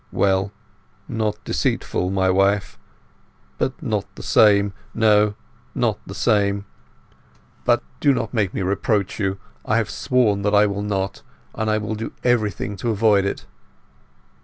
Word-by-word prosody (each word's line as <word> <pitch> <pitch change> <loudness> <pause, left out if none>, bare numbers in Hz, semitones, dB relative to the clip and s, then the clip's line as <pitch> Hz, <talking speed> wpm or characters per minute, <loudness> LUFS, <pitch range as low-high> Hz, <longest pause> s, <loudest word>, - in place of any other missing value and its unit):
"H'm—well. 95 0 +1 0.6
Not 110 -2 -2
deceitful, 90 - -1
my 95 0 +1
wife; 100 +1 +1 0.8
but - - -2
not - - -1
the - - -9
same. 100 -2 +4 0.2
No, 105 -2 +4 0.4
not - - 0
the - - -7
same. 100 -1 +1 1.0
But - - +3 0.2
do 145 - +4
not 115 -4 -2
make 105 -6 +1
me 95 - -3
reproach 100 +1 0
you. 95 -1 -1 0.3
I 110 - +1
have 110 -3 0
sworn 115 -6 +1
that 105 +1 +1
I 105 +1 +6
will 100 0 -2
not; 100 -1 -2 0.3
and 110 0 -2
I 110 - +2
will 110 +1 -3
do 110 +1 -5
everything 105 -5 0
to 115 +5 -2
avoid 105 -2 +3
it." 100 - -3
105 Hz, 145 wpm, -22 LUFS, 100-110 Hz, 1.0 s, I